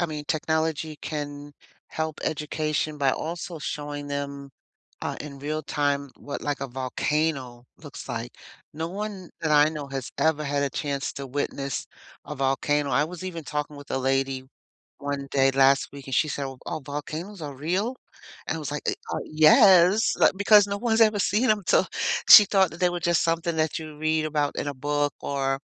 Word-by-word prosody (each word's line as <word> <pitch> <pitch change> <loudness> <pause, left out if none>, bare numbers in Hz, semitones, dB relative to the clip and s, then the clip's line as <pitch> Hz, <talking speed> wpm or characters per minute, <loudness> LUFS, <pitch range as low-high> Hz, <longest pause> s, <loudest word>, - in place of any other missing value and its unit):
I - - +2
mean, 150 -2 -6
technology 160 0 -1
can 145 -1 -5 0.4
help 160 -1 -4
education 155 0 -2
by 135 -2 +3
also 170 +2 -4
showing 145 0 -5
them, 140 -1 -5 0.5
uh, - - -3
in 140 -2 -9
real 155 +3 -3
time 140 -2 -1
what, 145 - -6
like, 145 -1 -2
a 140 - -2
volcano 130 0 -2
looks 145 -3 -10
like. 120 -1 -5 0.4
No 160 +1 -3
one 195 -1 -6
that 160 - -1
I 150 +1 +5
know 150 -3 -6
has 135 -2 -5
ever 155 -1 +2
had 140 0 0
a 140 - 0
chance 140 -1 -3
to 140 0 -6
witness 140 0 -3 0.4
a 150 - -5
volcano. 140 +1 0
I 140 +4 +3
was 180 +3 -8
even 170 -4 -5
talking 150 0 -4
with 145 0 -12
a 135 - 0
lady 135 0 0 0.6
1 140 -1 -4
day 135 -1 +4
last 135 +1 +4
week 140 -2 -10
and 135 - -6
she 155 - +3
said, 140 -2 -3
"Oh, 135 -1 -8
oh, 165 -2 -3
volcanoes 155 +7 -6
are 145 -3 -6
real?" 185 - -1 0.5
And - - -1
I - - -4
was 145 - -4
like, 150 - -4
"Uh, - - +2 0.2
ah, - - -1
yes." 185 - +6
Like, - - +5
because 205 0 +6
no 200 0 -2
one's 225 +1 +1
ever 215 -2 +5
seen 215 +6 +2
'em, 210 -2 +2
to - - +4 0.4
she 210 - +12
thought 190 -3 +3
that 170 - -10
they 180 -1 +3
were 175 - -3
just 170 -1 +2
something 165 0 0
that 160 +1 0
you 155 -2 -9
read 155 0 +1
about 150 -2 -1
in - - -3
a 145 - -2
book 145 +2 -1
or 135 -1 -1
150 Hz, 195 wpm, -25 LUFS, 140-165 Hz, 0.6 s, she